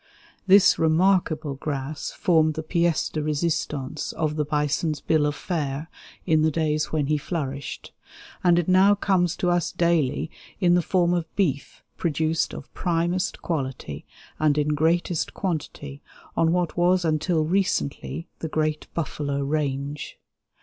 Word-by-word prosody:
This 195 +1 +6
remarkable 160 -2 +2
grass 140 +1 -4
formed 160 -4 +2
the 160 - -4
pièce 170 0 +1
de 155 - -2
résistance 150 -3 -2
of 155 -2 -1
the 150 - +1
bison's 150 +1 0
bill 150 0 +2
of 145 - -2
fare 150 -3 -3 0.3
in 155 -3 +3
the 160 - +4
days 155 -1 0
when 155 -2 +1
he 150 +1 +1
flourished, 140 -4 -5 0.5
and 175 -1 +5
it 175 - +1
now 190 +2 +5
comes 185 -4 +1
to 180 - 0
us 175 -2 +1
daily 165 -3 +1 0.3
in 175 -3 +4
the 175 - +4
form 175 0 +2
of 170 -2 -1
beef 145 -9 -1
produced 160 0 0
of - - -10
primest 175 +1 -1
quality 130 - -3 0.4
and 150 -1 +3
in 150 0 +1
greatest 160 +2 +1
quantity 145 -5 -4 0.3
on 165 0 +3
what 175 -1 0
was 180 +1 +3
until 155 +1 +1
recently 170 -3 -1
the 160 - -4
great 155 0 -1
buffalo 145 -3 -2
range. 145 0 -2
155 Hz, 145 wpm, -25 LUFS, 150-175 Hz, 0.5 s, This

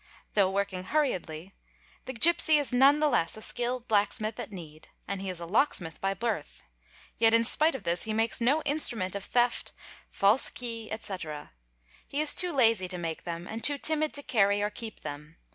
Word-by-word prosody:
'Though 200 -3 +3
working 190 -1 -3
hurriedly, 185 - -2 0.5
the 260 - -5
gipsy 320 +4 +5
is 285 -3 -1
none 275 +4 +5
the 305 - +2
less 170 - 0
a - - -10
skilled 245 +1 -2
blacksmith 215 +1 -1
at - - -6
need, 160 -5 -11 0.2
and 195 0 -4
he 195 - -5
is 180 -2 -5
a 170 - -6
locksmith 175 - -1
by 195 0 -1
birth, 210 -7 -4 0.6
yet 225 0 +4
in 230 - +3
spite 305 +6 +1
of 265 - -7
this 170 +1 -2
he 220 - -3
makes 225 +2 0
no 285 +6 +2
instrument 240 - +1
of 200 - -5
theft, 240 +2 0 0.4
false 205 +6 +4
key, 230 -3 -5
etc. 180 -9 -6
_ - - -41 0.5
He 280 - -3
is 305 -1 +6
too 360 -1 +2
lazy 230 - +3
to 180 0 -6
make 165 -2 -5
them 170 0 -5
and 225 +1 -7
too 290 -1 +3
timid 310 +1 +1
to 285 - -4
carry 200 -5 +2
or 210 - -1
keep 220 +1 -8
them. 150 +3 -9
220 Hz, 195 wpm, -28 LUFS, 185-260 Hz, 0.6 s, is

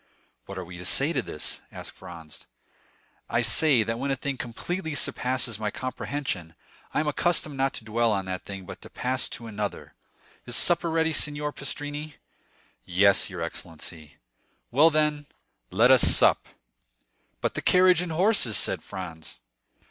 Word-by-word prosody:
"What 95 - -8
are 95 - -5
we 90 0 -10
to - - -7
say 140 - +3
to 135 - 0
this?" 75 - -3
asked - - -9
Franz. 80 -3 -12 0.8
"I - - +1
say, 140 -8 +4
that 115 +2 -3
when 140 - -2
a 135 - +1
thing 140 +1 -4
completely 160 +7 -4
surpasses 125 -4 0
my 105 -1 -1
comprehension, 125 - -5 0.4
I - - +1
am 155 - -3
accustomed 155 0 0
not 135 +1 0
to - - -6
dwell 115 +1 +1
on 100 -2 -1
that 95 -1 -5
thing, 95 -1 -8
but - - -10
to - - -11
pass 130 +1 -2
to 115 - -6
another. 105 -4 -5 0.5
Is 120 - 0
supper 170 +5 +4
ready, 160 0 +1
Signor 150 0 -1
Pastrini?" 145 +2 -5 0.7
"Yes, 95 +3 +3
your 90 -3 -5
excellency." 80 -2 -7 0.5
"Well, 150 +6 +6
then, 150 -2 0 0.4
let 115 +6 +4
us 130 -3 +6
sup." - - +5 0.9
"But - - -1
the - - -3
carriage 180 -1 +4
and 180 -2 -4
horses?" 170 - +3
said - - +2
Franz. 85 -4 -8
125 Hz, 160 wpm, -26 LUFS, 95-150 Hz, 0.9 s, Well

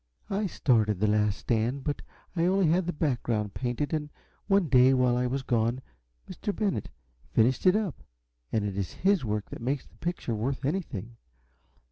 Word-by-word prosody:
I 200 +1 0
started 110 - +2
'The 105 - +2
Last 105 -1 +2
Stand,' 120 +4 0
but 145 - -2 0.3
I 165 -1 +2
only 190 0 +3
had 175 +2 +2
the - - +1
background 120 - -1
painted, 125 +5 -2
and 150 -1 -1 0.4
one 195 -3 +3
day 130 -1 +6
while 125 -1 +3
I 125 0 +1
was 135 +2 -2
gone 120 0 +1 0.5
Mr. 205 - -4
Bennett 195 - -1 0.4
finished 125 +9 +3
it 185 - +6
up 210 -9 -1 0.5
and 105 -2 +1
it 100 -2 -3
is 100 -2 -3
his 195 -4 +2
work 105 -2 -2
that - - -7
makes 135 +3 -1
the - - -23
picture 170 -8 -3
worth 130 +5 -2
anything. 120 - -3
130 Hz, 175 wpm, -28 LUFS, 110-165 Hz, 0.5 s, day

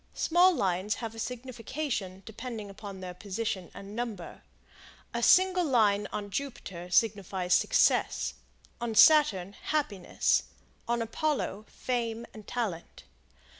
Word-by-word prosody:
Small 350 +3 +5
Lines 190 - 0
have 225 -2 -6
a 225 - -9
signification 245 -4 -4
depending 220 -2 -7
upon 195 -1 -9
their 180 -1 -6
position 195 0 -4
and 200 +1 -10
number. 225 -7 -5 0.7
A 235 - -1
single 370 +7 +5
line 210 -8 +3
on 205 -1 -5
Jupiter 195 -10 -5
signifies 190 -3 +1
success; - - +3 0.5
on 235 -2 -2
Saturn, 215 - +6
happiness; 220 -12 +1 0.5
on 235 0 0
Apollo, 230 -4 -2
fame 235 -2 -3
and 215 -2 -12
talent. 205 -9 -4
220 Hz, 115 wpm, -29 LUFS, 195-245 Hz, 0.7 s, Saturn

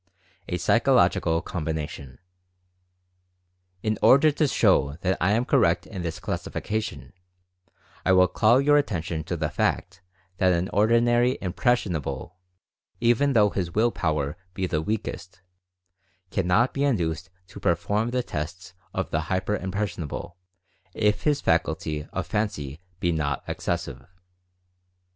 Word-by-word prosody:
A 90 - -1
PSYCHOLOGICAL 80 -1 +3
COMBINATION. 75 -6 -5 1.7
In 110 -1 -1
order 145 +3 +6
to 150 +1 +1
show 70 - +2
that 95 0 +1
I 95 +3 +3
am 115 +3 +1
correct 110 -12 +2
in 95 -5 -7
this 85 -2 -4
classifica 110 +1 -3
tion, 110 - -8 0.9
I 95 - +2
will 90 0 +6
call 110 +7 +4
your 145 +1 +4
attention 85 - -1
to 85 +1 -3
the 80 -1 -2
fact - - -1 0.4
that 95 -1 +3
an 85 +2 -1
ordinary 120 +4 +3
"impressionable" 90 - -1 0.6
even 120 +4 +3
though 105 -4 +4
his 85 -3 -3
Will 115 +3 +3
Power 75 -3 -1 0.2
be 95 - -1
the 80 -4 -1
weakest, 100 -1 -4 0.9
cannot 95 +7 +2
be 140 - -1
induced 90 - 0 0.2
to 100 - -10
perform 100 +5 0
the 125 0 -1
tests 90 +2 -6 0.2
of - - -2
the 80 - +1
"hyper 95 +2 0
impressionable" 90 -4 -4 0.6
if 105 -1 +1
his 145 -2 +2
faculty 80 -2 0
of 95 - -3
Fancy 90 -10 -3 0.2
be 85 - +1
not 70 -4 -1
excessive. - - -3
95 Hz, 130 wpm, -25 LUFS, 80-110 Hz, 1.7 s, order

